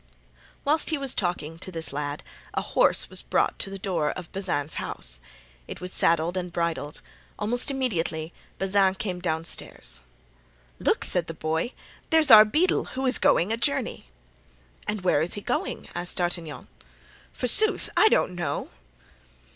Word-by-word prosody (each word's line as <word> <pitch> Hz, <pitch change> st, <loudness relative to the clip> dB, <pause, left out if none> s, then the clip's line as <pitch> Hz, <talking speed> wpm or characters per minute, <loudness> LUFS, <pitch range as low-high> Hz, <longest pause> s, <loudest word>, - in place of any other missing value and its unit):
Whilst 305 Hz, +3 st, +2 dB
he 315 Hz, -, +1 dB
was 275 Hz, -2 st, -2 dB
talking 165 Hz, -3 st, -2 dB
to 185 Hz, -, -8 dB
this 165 Hz, -5 st, -4 dB
lad 145 Hz, 0 st, -3 dB, 0.3 s
a -, -, 0 dB
horse -, -, +3 dB
was -, -, -1 dB
brought -, -, 0 dB
to -, -, -1 dB
the 195 Hz, -, -6 dB
door 175 Hz, -6 st, -1 dB
of 175 Hz, 0 st, -6 dB
Bazin's 175 Hz, -6 st, -1 dB
house. -, -, -4 dB, 0.5 s
It -, -, -7 dB
was 180 Hz, 0 st, -5 dB
saddled 170 Hz, +2 st, +2 dB
and 180 Hz, -1 st, -3 dB
bridled. 165 Hz, -4 st, -2 dB, 0.4 s
Almost 240 Hz, +6 st, 0 dB
immediately 175 Hz, -, -1 dB, 0.2 s
Bazin 195 Hz, 0 st, +2 dB
came 185 Hz, -2 st, -3 dB
downstairs. 160 Hz, -, -4 dB, 0.8 s
"Look!" -, -, +1 dB
said 175 Hz, -2 st, +1 dB
the 165 Hz, -, -6 dB
boy, 160 Hz, -, -2 dB, 0.4 s
"there's 320 Hz, -5 st, +4 dB
our 215 Hz, -1 st, +11 dB
beadle, 310 Hz, +12 st, +2 dB
who 265 Hz, +1 st, -4 dB
is 260 Hz, -, +2 dB
going 180 Hz, +6 st, +3 dB
a 225 Hz, -, 0 dB
journey." 280 Hz, +4 st, -1 dB, 0.8 s
"And 210 Hz, -1 st, -2 dB
where 175 Hz, -5 st, +3 dB
is 165 Hz, -, -2 dB
he 205 Hz, -, -5 dB
going?" -, -, -2 dB
asked 175 Hz, +1 st, -4 dB
D'Artagnan. 170 Hz, -5 st, -3 dB, 0.6 s
"Forsooth, 425 Hz, -, +3 dB
I 435 Hz, -, +6 dB
don't 185 Hz, -, +2 dB
know." 175 Hz, -1 st, -3 dB
180 Hz, 155 wpm, -26 LUFS, 160-215 Hz, 0.8 s, our